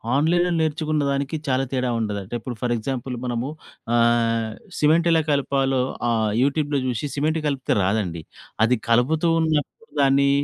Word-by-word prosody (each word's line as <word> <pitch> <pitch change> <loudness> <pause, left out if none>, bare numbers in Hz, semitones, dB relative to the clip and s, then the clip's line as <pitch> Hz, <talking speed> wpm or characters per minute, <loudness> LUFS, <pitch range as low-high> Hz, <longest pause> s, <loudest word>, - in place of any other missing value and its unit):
ఆన్‌లైన్‌లో 175 +5 +2
నేర్చుకున్నదానికి 150 -2 -1
చాలా 130 0 +1
తేడా 125 -1 0
ఉండదంటే 105 -2 -4
ఇప్పుడు 120 +2 -6
ఫర్ 120 -1 0
ఎగ్జాంపుల్ 125 +2 -4
మనము 120 +2 -2 0.5
ఆహ్, 115 -1 +2 0.3
సిమెంట్ 160 +3 +3
ఎలా 160 -1 +4
కలపాలో 135 -2 +1 0.3
ఆహ్, 110 -2 +1
యూట్యూబ్‌లో 145 +1 +1
చూశి 125 +4 -2
సిమెంట్ 155 +3 0
కలిపితే 135 -2 0
రాదండి. 95 -5 -1 0.4
అది 125 +2 +2
కలుపుతూ 150 +8 +3
ఉన్నప్పుడు 160 +8 -2
దాన్ని 140 0 +4
135 Hz, 130 wpm, -23 LUFS, 120-150 Hz, 0.5 s, ఎలా